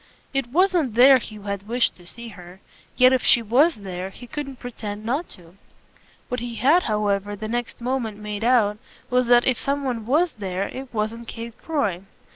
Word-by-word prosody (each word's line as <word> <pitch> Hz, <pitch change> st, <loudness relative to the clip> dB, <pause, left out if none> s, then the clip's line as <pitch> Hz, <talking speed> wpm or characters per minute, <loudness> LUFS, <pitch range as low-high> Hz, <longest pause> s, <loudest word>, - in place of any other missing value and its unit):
It 270 Hz, -3 st, 0 dB
wasn't 335 Hz, -, +2 dB
there 260 Hz, +2 st, +8 dB
he 220 Hz, -, -9 dB
had 200 Hz, -1 st, -5 dB
wished 240 Hz, +2 st, +1 dB
to 175 Hz, -1 st, -15 dB
see 235 Hz, +5 st, -8 dB
her; 180 Hz, -2 st, -13 dB, 0.4 s
yet 255 Hz, +1 st, +6 dB
if 260 Hz, -, +2 dB
she 235 Hz, -, +5 dB
WAS 270 Hz, +10 st, +4 dB
there 190 Hz, -2 st, -6 dB
he 240 Hz, +5 st, -12 dB
couldn't 275 Hz, +1 st, -6 dB
pretend 215 Hz, -4 st, -7 dB
not 275 Hz, +9 st, -1 dB
to. 175 Hz, +1 st, -18 dB, 0.7 s
What 250 Hz, -, -3 dB
he 240 Hz, 0 st, -5 dB
had 285 Hz, +10 st, +4 dB
however 205 Hz, -, -1 dB
the 215 Hz, +2 st, -6 dB
next 240 Hz, +1 st, -3 dB
moment 240 Hz, -4 st, -2 dB
made 210 Hz, 0 st, -5 dB
out 225 Hz, -4 st, +3 dB, 0.3 s
was 250 Hz, -1 st, +2 dB
that 240 Hz, 0 st, +5 dB
if 255 Hz, -3 st, +2 dB
some 280 Hz, +1 st, -1 dB
one 235 Hz, -5 st, -3 dB
was 320 Hz, +6 st, +2 dB
there 195 Hz, -1 st, -3 dB
it 265 Hz, 0 st, -8 dB
wasn't 225 Hz, +1 st, -3 dB
Kate 230 Hz, 0 st, -7 dB
Croy. 210 Hz, -, -1 dB
235 Hz, 190 wpm, -23 LUFS, 205-255 Hz, 0.7 s, there